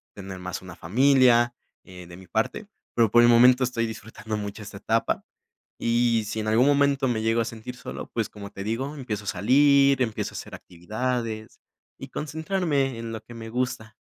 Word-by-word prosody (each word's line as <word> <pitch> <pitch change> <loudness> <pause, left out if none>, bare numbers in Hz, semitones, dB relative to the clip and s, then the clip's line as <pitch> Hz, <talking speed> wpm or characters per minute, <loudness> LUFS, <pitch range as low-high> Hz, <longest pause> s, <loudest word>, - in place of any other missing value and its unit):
tener 95 -2 -8
más 90 0 -5
una 90 -2 -10
familia 120 +5 +4 0.3
eh 90 -2 -12
de 85 0 -11
mi 95 - -13
parte, - - -2 0.3
pero 115 -3 +3
por 120 - +7
el 120 - +6
momento 125 +2 +6
estoy 125 -2 0
disfrutando 110 -1 -6
mucho 105 +1 -6
esta 105 -1 -9
etapa. 115 +3 0 0.6
Y 115 -1 +2
si 105 +1 -4
en 110 - -4
algún 115 +4 +4
momento 140 -1 +3
me 115 -3 0
llego 115 +1 +2
a - - -1
sentir 115 +2 -7
solo, - - -8
pues, 115 -2 -1
como 100 -1 -9
te 100 -1 -7
digo, 130 +8 -3
empiezo 110 -7 -5
a - - -10
salir, 140 +6 +4
empiezo 110 -4 -2
a - - -6
hacer - - -8
actividades 110 +4 -4 0.4
y - - -7
concentrarme 155 -3 -1
en 115 0 -5
lo 110 - -6
que 120 - -13
me 115 -1 -8
gusta. 115 -2 -3
115 Hz, 190 wpm, -25 LUFS, 105-130 Hz, 0.6 s, por